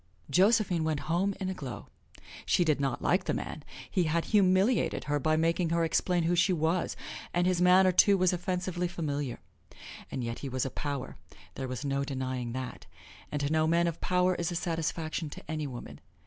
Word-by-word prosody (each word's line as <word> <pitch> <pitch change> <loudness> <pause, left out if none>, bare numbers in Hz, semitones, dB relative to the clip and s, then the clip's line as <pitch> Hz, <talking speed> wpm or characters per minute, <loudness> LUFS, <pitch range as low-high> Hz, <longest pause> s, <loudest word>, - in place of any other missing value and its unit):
Josephine 190 - +3
went 155 -2 -1
home 185 +5 0
in 190 - -2
a 190 - -1
glow. 125 - -7 0.6
She 175 - +3
did 150 -3 +2
not 135 -3 -1
like 185 +1 +2
the - - 0
man 150 - -5 0.2
he 180 -3 +1
had 165 +1 0
humiliated 195 +4 +3
her 145 0 0
by 155 +3 +2
making 165 +2 +1
her 170 0 +1
explain 175 +1 +1
who 170 +2 +2
she 180 +2 +3
was, 165 +2 0 0.4
and 175 0 +3
his 180 -1 +2
manner, 185 +1 +6
too, 195 +2 +5
was 185 -1 +3
offensively 180 0 -2
familiar. 145 -7 -3 0.7
And 130 - -4
yet 115 0 -4
he 140 - -5
was 130 0 -1
a 135 - -3
power, 140 -3 -4 0.4
there 135 - -4
was 130 +2 -5
no 140 0 0
denying 130 -3 -3
that, 130 0 -6 0.4
and 145 - -2
to 140 +1 -1
know 155 0 +3
men 170 +1 +3
of 170 -1 -3
power 180 0 +2
is 170 -1 -2
a - - -3
satisfaction 165 -1 -2
to - - -10
any 155 -2 -3
woman. 125 -3 -8
165 Hz, 195 wpm, -30 LUFS, 145-180 Hz, 0.7 s, manner